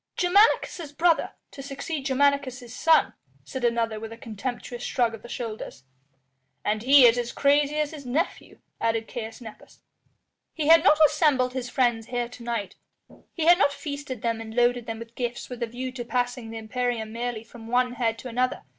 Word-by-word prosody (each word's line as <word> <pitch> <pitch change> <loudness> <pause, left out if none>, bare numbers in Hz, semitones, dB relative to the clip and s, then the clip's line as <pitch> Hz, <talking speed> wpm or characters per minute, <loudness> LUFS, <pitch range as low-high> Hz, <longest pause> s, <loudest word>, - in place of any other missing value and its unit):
"Germanicus' 355 -4 +3
brother 335 +2 +2 0.2
to 275 - -9
succeed 275 +1 -5
Germanicus' 265 -3 0
son," 325 +4 +4 0.3
said 260 -2 -6
another 230 -2 0
with 225 0 -7
a 230 - -9
contemptuous 240 +2 -6
shrug 240 -2 0
of 225 - -9
the 240 - -12
shoulders. 220 - -6 0.8
"And 210 +1 0
he 270 +2 +7
is 240 +1 +5
as 240 0 -3
crazy 290 +1 +2
as 300 -1 0
his 300 -3 -9
nephew," 280 +8 -3 0.2
added 225 0 0
Caius 225 0 -7
Nepos. 220 -2 -13 0.7
He 310 - -2
had 330 0 +8
not 305 -5 +6
assembled 290 -5 +2
his 255 -2 -4
friends 240 -4 +1
here 245 -1 -2
to 245 - -12
night, 230 -5 -4 0.5
he 325 - -3
had 345 +2 +7
not 285 - +4
feasted 285 -4 -6
them 230 -1 -1
and 220 0 -8
loaded 245 -1 +2
them 225 -1 -4
with 230 0 -10
gifts 240 0 -4
with 245 -1 -7
a 235 - 0
view 255 +3 -5
to 250 -2 -6
passing 245 -1 -2
the 225 - -6
imperium 225 0 -3
merely 235 -1 -3
from 230 0 -13
one 250 +1 +2
head 230 -3 -1
to 255 - -8
another. 250 +1 -1
245 Hz, 185 wpm, -26 LUFS, 230-280 Hz, 0.8 s, had